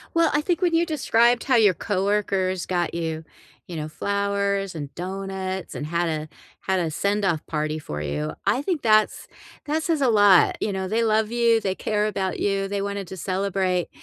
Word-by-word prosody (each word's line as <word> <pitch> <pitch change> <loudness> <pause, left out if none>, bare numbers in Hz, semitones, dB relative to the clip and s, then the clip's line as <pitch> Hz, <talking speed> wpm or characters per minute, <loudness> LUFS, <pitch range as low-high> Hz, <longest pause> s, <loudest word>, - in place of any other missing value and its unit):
Well, 335 -1 +4
I 295 - +3
think 335 +3 -1
when 350 -2 +2
you 330 +1 +3
described 245 -6 +2
how 260 -3 +3
your 210 -4 +5
coworkers 195 -1 0
got 175 -2 -1
you, 160 -1 -3 0.4
you 175 - -7
know, 155 -1 -4
flowers 200 +2 -1
and 145 -4 -7
donuts 190 +1 -5
and 150 - -4
had 170 +2 0
a 155 -1 -3 0.3
had 190 -1 0
a 170 -2 -1
send-off 195 -1 0
party 155 0 -2
for 75 - -6
you, 75 +1 -3
I 260 - +2
think 340 -3 -1
that's 215 -2 +2 0.4
that 310 +2 -1
says 320 -3 0
a 265 - +4
lot, 205 -4 +5
you 210 - 0
know, 190 0 -3
they 225 +4 +1
love 220 0 +1
you, 235 -1 +3
they 190 -2 -1
care 210 +1 0
about 195 -3 -2
you, 195 -1 0
they 200 0 -2
wanted 200 -1 -4
to 190 - -7
celebrate. 185 0 -1
195 Hz, 195 wpm, -24 LUFS, 175-220 Hz, 0.4 s, your